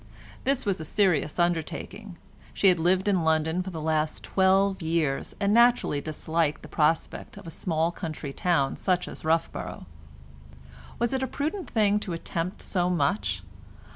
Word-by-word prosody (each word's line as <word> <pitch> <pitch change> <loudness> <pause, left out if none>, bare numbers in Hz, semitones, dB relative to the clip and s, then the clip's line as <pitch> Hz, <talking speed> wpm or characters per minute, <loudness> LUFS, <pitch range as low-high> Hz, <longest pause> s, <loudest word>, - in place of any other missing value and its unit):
This 270 0 +1
was 195 -4 0
a - - -4
serious 160 -3 +1
undertaking; 175 +3 -2 0.4
she 195 - +5
had 180 -2 +3
lived 185 +4 +2
in 190 -4 +2
London 160 +2 +1
for 185 - -5
the 165 -3 -6
last 155 0 -1
twelve 190 0 +2
years, 160 -4 -1
and 200 0 +2
naturally 235 -11 +4
disliked 155 0 -1
the - - -8
prospect 160 +5 0
of 200 - -11
a 165 - -7
small 165 0 0
country 155 -5 -6
town 165 -6 +1
such 180 -2 0
as - - -8
Roughborough. 165 +1 -1 1.1
Was 235 +2 0
it 265 - 0
a 265 - 0
prudent 315 +9 -3
thing 210 -2 +2
to 190 -4 -5
attempt 165 +2 -4
so 180 -2 0
much? 140 - 0
175 Hz, 160 wpm, -27 LUFS, 160-200 Hz, 1.1 s, she